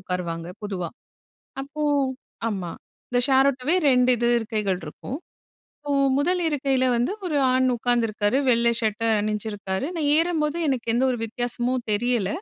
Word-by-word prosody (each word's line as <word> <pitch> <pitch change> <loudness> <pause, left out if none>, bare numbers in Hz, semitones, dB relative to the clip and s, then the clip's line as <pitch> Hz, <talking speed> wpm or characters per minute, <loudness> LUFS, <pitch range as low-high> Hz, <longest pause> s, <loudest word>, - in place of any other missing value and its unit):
உட்காருவாங்க 175 -2 -4 0.2
பொதுவா. 185 -4 -3 0.7
அப்போ 290 +2 -6 0.7
ஆமா. 185 -5 -3 0.4
இந்த 245 - +2
ஷேர் 270 0 +5
ஆட்டோவே 270 +5 -1 0.2
2 250 0 +4
இது 235 +1 0
இருக்கைகள் 210 -5 -1
இருக்கும். 200 - -7 0.6
இப்போ 290 -1 -4 0.3
1 355 +5 +1
இருக்கையில 270 -3 +1
வந்து 245 +11 0
ஒரு 305 - -1 0.2
ஆண் 260 0 +3
உட்காந்துருக்காரு. 230 -2 +1
வெள்ளை 235 0 +3
ஷர்ட 220 0 -1 0.2
அணிஞ்சிருக்காரு. 210 -1 -3
நான் 300 -3 0
ஏறும்போது 325 -2 0
எனக்கு 255 -4 -1
எந்த 255 +2 +2
ஒரு 245 - -1
வித்தியாசமும் 245 +2 -2
தெரியல. 235 -2 +1
240 Hz, 135 wpm, -24 LUFS, 210-270 Hz, 0.7 s, ஷேர்